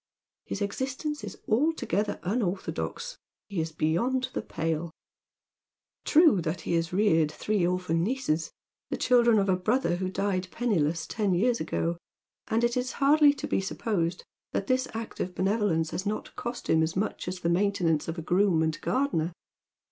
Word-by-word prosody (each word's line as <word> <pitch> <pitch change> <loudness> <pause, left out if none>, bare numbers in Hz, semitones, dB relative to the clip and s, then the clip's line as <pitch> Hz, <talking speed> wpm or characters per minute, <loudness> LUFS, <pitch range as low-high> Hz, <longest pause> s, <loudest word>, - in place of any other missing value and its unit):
His 205 - -3
existence 265 +8 -3
is - - -7
altogether 215 - +1
unorthodox. 210 - -2 0.3
He 195 -5 -1
is 160 0 -3
beyond 230 +13 0
the - - -1
pale. 165 0 -2 1.2
True 310 - +5
that 160 +1 -3
he - - -2
has 165 0 0
reared 165 -6 +3
three 200 +2 0
orphan 180 -2 0
nieces, 200 -8 -1 0.4
the - - -2
children 240 -2 +4
of 200 -1 +2
a 190 - +3
brother 185 -1 +1
who 185 0 -2
died 190 -1 -1
penniless 170 -10 0
ten 205 -4 0
years 235 +6 +2
ago; 165 +1 -1 0.5
and 225 +2 +1
it 240 0 +2
is 250 0 -1
hardly 290 +1 +5
to - - -5
be - - +1
supposed 185 -3 -2 0.3
that 195 - -1
this 255 +3 +1
act 225 0 -6
of 180 0 -3
benevolence 190 -5 +1
has 185 - -3
not 210 - -4
cost 240 0 -5
him 160 - +4
as 160 +1 0
much 195 0 -2
as 180 0 -4
the 170 - +1
maintainance 175 -4 +1
of 165 +1 -4
a 165 - -4
groom 180 -1 +3
and 160 -1 -1
gardener. 175 - 0
190 Hz, 165 wpm, -28 LUFS, 170-235 Hz, 1.2 s, True